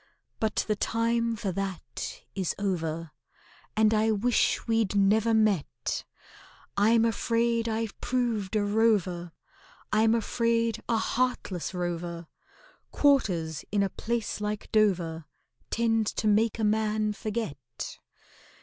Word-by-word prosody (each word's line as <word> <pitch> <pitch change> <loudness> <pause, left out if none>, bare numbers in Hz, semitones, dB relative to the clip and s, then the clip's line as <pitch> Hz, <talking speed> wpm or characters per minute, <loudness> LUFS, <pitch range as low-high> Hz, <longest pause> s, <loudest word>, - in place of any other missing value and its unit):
But 220 -1 0
the 215 - +1
time 230 +2 0
for 205 -3 -2
that 190 -1 -5
is 190 -4 -1
over, 165 -5 -2 0.7
And 220 0 +4
I 220 +1 +3
wish 220 +3 +2
we'd 225 -3 +1
never 210 +3 +4
met. 215 -7 +1 0.7
I'm 225 +3 +4
afraid 230 0 +1
I've 225 -1 -3
proved 230 -5 -1
a 210 - +2
rover— 205 -5 +1 0.6
I'm 220 +1 +4
afraid 230 0 0
a 230 - +3
heartless 220 -7 -1
rover— 175 -1 -3 0.6
Quarters 180 - +2
in 200 -1 +2
a 195 - 0
place 230 -2 -3
like 210 0 -3
Dover 175 -7 +2 0.4
Tend 225 -2 +1
to 220 - -2
make 215 +2 +3
a 225 - -2
man 215 0 +1
forget. 200 - -5
215 Hz, 115 wpm, -28 LUFS, 190-230 Hz, 0.7 s, And